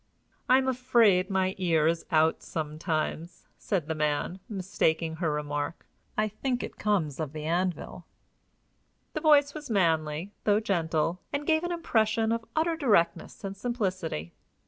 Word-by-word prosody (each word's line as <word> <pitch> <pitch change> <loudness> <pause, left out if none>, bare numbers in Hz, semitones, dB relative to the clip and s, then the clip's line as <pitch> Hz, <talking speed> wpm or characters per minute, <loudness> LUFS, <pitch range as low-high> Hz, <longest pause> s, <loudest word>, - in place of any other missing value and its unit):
"I 255 - +7
am 265 0 +1
afraid 235 -7 +3
my 190 -1 +1
ear 165 -4 +2
is 165 +1 0
out 160 -1 +3
sometimes," 155 +1 -3
said 185 -7 -1
the 160 - -2
man, 150 +4 -1
mistaking 165 -5 0
her 165 -2 0
remark. 145 +1 -3 0.3
"I 215 0 +2
think 245 +4 -2
it - - -8
comes 175 -10 0
of 155 -2 -3
the 155 -1 -5
anvil." 175 +2 -2 1.1
The - - -3
voice 290 -2 +5
was 300 -3 -8
manly, 165 -3 +1
though 210 0 +3
gentle, 170 -4 0
and 285 0 -2
gave 315 +1 +2
an 350 - -2
impression 225 -9 +1
of 230 0 -1
utter 325 +1 +2
directness 220 - +1
and 195 0 -4
simplicity. 185 - -3
185 Hz, 145 wpm, -28 LUFS, 160-230 Hz, 1.1 s, I